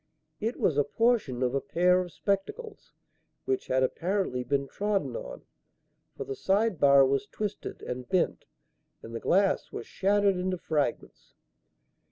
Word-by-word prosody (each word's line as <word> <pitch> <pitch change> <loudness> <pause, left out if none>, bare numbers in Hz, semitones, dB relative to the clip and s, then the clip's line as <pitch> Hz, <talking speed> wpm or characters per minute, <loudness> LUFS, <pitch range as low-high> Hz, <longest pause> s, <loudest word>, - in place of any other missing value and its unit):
It 225 +3 -2
was 145 -4 +2
a - - +5
portion 150 - +1
of 125 0 0
a 140 - 0
pair 180 +1 +3
of 180 -1 -6
spectacles, 310 - -3 0.5
which 390 0 -1
had 130 0 +2
apparently 175 -3 -1
been 140 +1 -1
trodden 205 +5 -1
on, - - -7 0.7
for - - -3
the 415 -1 -5
side 205 - +1
bar 140 -1 +7
was 140 +9 0
twisted 210 -1 -5
and 125 0 -6
bent 185 -2 0 0.6
and 115 - -9
the 115 - -3
glass 195 +7 +2
was - - -6
shattered 200 0 +2
into 185 0 -1
fragments. 150 -6 -3
185 Hz, 150 wpm, -28 LUFS, 140-210 Hz, 0.7 s, bar